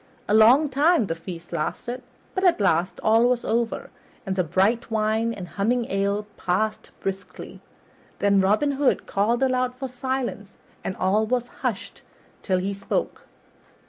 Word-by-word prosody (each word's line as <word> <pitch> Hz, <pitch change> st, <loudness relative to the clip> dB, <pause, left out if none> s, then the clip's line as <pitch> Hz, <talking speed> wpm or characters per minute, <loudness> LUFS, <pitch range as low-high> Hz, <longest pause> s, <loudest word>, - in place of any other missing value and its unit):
A -, -, +1 dB
long 240 Hz, +8 st, +6 dB
time 290 Hz, 0 st, +3 dB
the 165 Hz, -, -2 dB
feast 165 Hz, 0 st, -9 dB
lasted, 240 Hz, +10 st, -3 dB, 0.3 s
but 375 Hz, -, -2 dB
at 360 Hz, -9 st, +4 dB
last 180 Hz, -2 st, +1 dB
all 225 Hz, +2 st, +5 dB
was 250 Hz, -1 st, 0 dB
over, 230 Hz, 0 st, -1 dB, 0.3 s
and 190 Hz, -1 st, -2 dB
the 185 Hz, -, +2 dB
bright 195 Hz, +9 st, +1 dB
wine 220 Hz, +1 st, +1 dB
and 195 Hz, -6 st, -6 dB
humming 235 Hz, +6 st, 0 dB
ale 200 Hz, +1 st, 0 dB
passed 215 Hz, +4 st, -1 dB
briskly. 195 Hz, 0 st, -6 dB, 0.6 s
Then 200 Hz, -1 st, +3 dB
Robin 215 Hz, +10 st, +2 dB
Hood 275 Hz, -1 st, +1 dB
called 230 Hz, +6 st, +1 dB
aloud 255 Hz, -1 st, +1 dB
for 265 Hz, +1 st, -5 dB
silence, 250 Hz, -5 st, -4 dB, 0.3 s
and 185 Hz, -, -3 dB
all 205 Hz, +4 st, +2 dB
was 245 Hz, 0 st, -1 dB
hushed -, -, -3 dB, 0.4 s
till 185 Hz, -2 st, 0 dB
he 190 Hz, +2 st, -2 dB
spoke. 200 Hz, -, -3 dB
220 Hz, 150 wpm, -24 LUFS, 195-250 Hz, 0.6 s, long